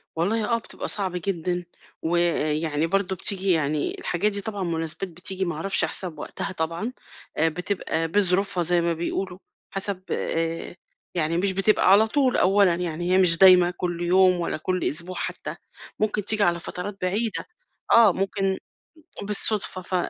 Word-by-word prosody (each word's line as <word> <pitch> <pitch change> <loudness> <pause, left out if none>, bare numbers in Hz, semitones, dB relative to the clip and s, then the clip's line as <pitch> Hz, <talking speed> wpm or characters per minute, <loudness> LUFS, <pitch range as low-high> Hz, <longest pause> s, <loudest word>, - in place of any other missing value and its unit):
والله 210 +7 0
آه، - - +3
بتبقى 230 - -8
صعب 195 -3 +2
جدًا، 180 -1 -3 0.4
ويعني 160 -2 0
برضه 195 +1 -1
بتيجي 190 +1 +1
يعني 150 -3 0
الحاجات 200 +5 0
دي 200 0 -2
طبعًا 205 -1 -4
مناسبات 165 +2 -3
بتيجي 185 +3 -2
ما 170 -3 -3
أعرفش 195 +6 +1
حسب 175 -5 -2
وقتها 195 - -4
طبعًا، 170 +7 -3 0.5
بتبقى 165 0 -1
بظروفها 190 0 +1
زي 175 +1 +3
ما 170 0 0
بيقولوا، 180 +2 -4 0.3
حسب 195 -1 -3
آآ، 165 +1 -3 0.4
يعني 165 0 0
مش 195 +2 +3
بتبقى 195 0 +3
على 210 +3 +6
طول 260 +1 +1
أولًا 195 -2 +3
يعني، 175 0 -3
هي - - +5
مش 180 -3 +6
دايمة 180 -1 +7
كل 175 -1 -3
يوم 185 +1 +4
ولا 170 - -2
كل 185 +3 -2
أسبوع 170 +5 0
حتى، - - -4 0.4
ممكن 210 -1 -1
تيجي 215 -1 +3
على 175 -1 +1
فترات 185 +4 -5
بعيدة، 205 +4 -1 0.5
آه، 225 -5 +6
ممكن 195 0 -1 0.7
بالصدفة 205 -2 +1
ف 185 - -6
180 Hz, 150 wpm, -24 LUFS, 170-195 Hz, 0.7 s, دايمة